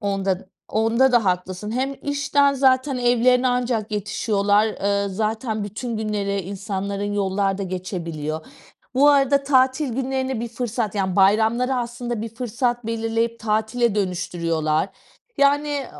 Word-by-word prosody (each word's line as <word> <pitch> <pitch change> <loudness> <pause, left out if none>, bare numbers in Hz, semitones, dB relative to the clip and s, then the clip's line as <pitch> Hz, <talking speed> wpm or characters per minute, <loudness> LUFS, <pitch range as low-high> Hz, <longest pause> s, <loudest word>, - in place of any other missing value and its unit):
Onda 195 -2 -1 0.2
onda 230 +4 +2
da 235 -3 +4
haklısın. 185 +2 -2
Hem 260 +4 -1
işten 285 0 +2
zaten 265 0 +2
evlerine 245 +1 +3
ancak 245 -3 -1
yetişiyorlar. 205 0 +1 0.2
Iıı, 200 0 +1
zaten 215 +2 -2
bütün 220 +3 -5
günleri 205 -2 -1
insanların 200 +1 -4
yollarda 195 0 0
geçebiliyor. 170 -4 -4 0.5
Bu 280 +3 +5
arada 280 0 +3
tatil 265 +1 +2
günlerini 265 -1 -2
bir 235 - -3
fırsat, 230 -2 -3
yani, 190 -3 -1
bayramları 220 +6 +3
aslında 240 -1 -3
bir 225 - -4
fırsat 240 0 -2
belirleyip 230 0 -1
tatile 220 +1 0
dönüştürüyorlar. 170 -4 -1 0.5
Yani, 285 -1 +2
220 Hz, 120 wpm, -22 LUFS, 200-250 Hz, 0.5 s, Bu